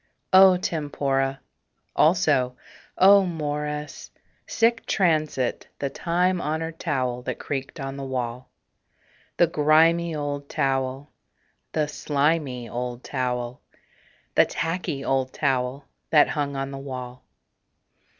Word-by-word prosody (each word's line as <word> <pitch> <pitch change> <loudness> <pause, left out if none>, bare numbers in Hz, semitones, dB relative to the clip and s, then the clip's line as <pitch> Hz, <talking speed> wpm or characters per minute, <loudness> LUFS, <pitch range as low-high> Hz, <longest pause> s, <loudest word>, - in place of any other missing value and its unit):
O 190 -1 +8
tempora! 140 -5 -1 0.6
Also, 150 -7 +3 0.4
O 200 +1 +7
mores! 150 -3 -4 0.4
Sic 230 0 +2
transit 155 - 0
The 140 -1 -3
time 180 +1 0
honored 160 +2 -3
towel 130 -6 -1
that - - -4
creaked 135 +2 -5
on 135 0 -5
the 140 - -5
wall. 125 -2 -4 0.9
The 175 - +6
grimy 165 +2 +3
old 145 -1 -4
towel, 135 +1 -1 0.6
the 155 -2 +1
slimy 145 -4 -1
old 120 +1 -5
towel, 125 -2 -3 0.7
The - - +5
tacky 165 -4 -3
old 130 -1 0
towel 135 -1 -1 0.2
that 150 -2 +5
hung 145 -2 -2
on 135 0 -3
the 135 - -6
wall. 125 -2 -7
145 Hz, 110 wpm, -24 LUFS, 130-160 Hz, 0.9 s, O